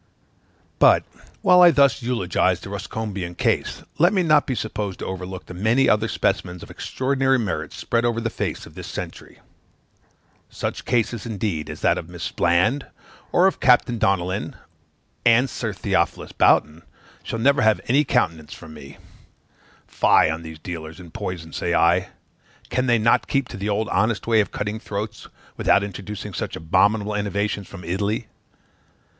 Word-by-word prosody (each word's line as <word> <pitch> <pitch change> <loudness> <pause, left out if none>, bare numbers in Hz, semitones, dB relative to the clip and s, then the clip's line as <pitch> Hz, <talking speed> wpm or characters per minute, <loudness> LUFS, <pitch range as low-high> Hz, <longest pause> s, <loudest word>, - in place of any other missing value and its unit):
But, - - +6 0.4
whilst 180 0 +7
I 175 - +9
thus 140 -3 +3
eulogize 95 -6 0
the 100 - -9
Ruscombian 100 -3 -5
case, - - -1 0.2
let 175 +5 +5
me 190 -3 +2
not 150 -3 +4
be 130 - -1
supposed 105 -3 -4
to - - -6
overlook 95 0 -6
the - - -10
many 110 +9 +2
other 105 +1 +3
specimens 90 -5 -1
of - - -11
extraordinary 135 0 0
merit 85 - -3
spread 115 0 -1
over 120 -1 +1
the 115 -1 -2
face - - -4
of - - -14
this - - -8
century. - - -8 1.1
Such - - -5
cases, 115 -2 0
indeed, 100 -8 -3
as - - -8
that - - +2
of 80 - -9
Miss 85 -1 -5
Bland, 95 +11 +1 0.4
or 180 - +4
of 190 - +2
Captain 120 -2 +3
Donnellan, 95 -1 0 0.7
and 120 +3 +5
Sir - - -4
Theophilus - - -1
Boughton, 75 +2 +3 0.4
shall - - -5
never 140 +4 +3
have 110 -1 +4
any 140 +5 +4
countenance 80 - -1
from 80 -2 -12
me. 70 -2 -12 0.9
Fie 80 - +3
on 80 +1 -4
these 80 -1 -9
dealers 80 0 -7
in 85 -3 -12
poison, 90 -6 -6
say 85 0 -1
I: 90 +2 +3 0.6
can 130 0 0
they 120 -1 +4
not 110 +1 +2
keep 135 -3 0
to - - -7
the 100 +2 -3
old 105 +1 0
honest 110 0 0
way 115 -1 +3
of 100 - -3
cutting 105 +1 -4
throats, 105 0 -6 0.3
without 100 - +3
introducing 100 +1 -7
such - - -4
abominable 105 +6 +1
innovations 100 0 -2
from 90 -3 -10
Italy? 100 +6 -2
105 Hz, 160 wpm, -22 LUFS, 90-120 Hz, 1.1 s, I